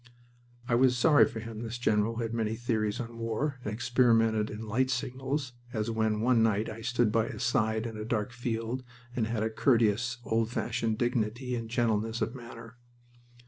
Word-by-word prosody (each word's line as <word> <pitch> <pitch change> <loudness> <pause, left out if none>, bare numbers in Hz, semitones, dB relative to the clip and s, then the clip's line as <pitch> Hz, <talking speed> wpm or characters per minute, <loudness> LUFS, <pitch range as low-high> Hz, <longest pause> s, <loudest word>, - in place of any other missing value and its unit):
I 125 - 0
was 125 +1 +4
sorry 150 +4 +6
for 110 - -6
him, 115 -1 -7
this 115 +1 -4
general 110 -1 +1
who 115 - -2
had 115 0 -3
many 110 -1 -1
theories 110 -3 -1
on 115 -1 -6
war 125 +5 -2
and 105 - -3
experimented 115 -2 +3
in 110 +1 -6
light 130 +5 +1
signals, 130 +2 -2 0.2
as 110 +1 -1
when 110 -1 0
one 120 0 +4
night 110 -1 +2
I 115 - -8
stood 120 -2 +1
by 115 0 +2
his - - -5
side 110 -1 +1
in 110 -2 -5
a 105 - -4
dark 110 0 -1
field, 120 0 -3 0.3
and 115 -3 0
had 115 -1 -1
a 110 - -1
courteous 115 0 +2
old 115 0 +1
fashioned 115 -2 -1
dignity 120 +1 -1
and 115 -2 -3
gentleness 115 -1 0
of 115 0 -1
manner. 115 -1 -10
115 Hz, 185 wpm, -30 LUFS, 110-120 Hz, 0.3 s, sorry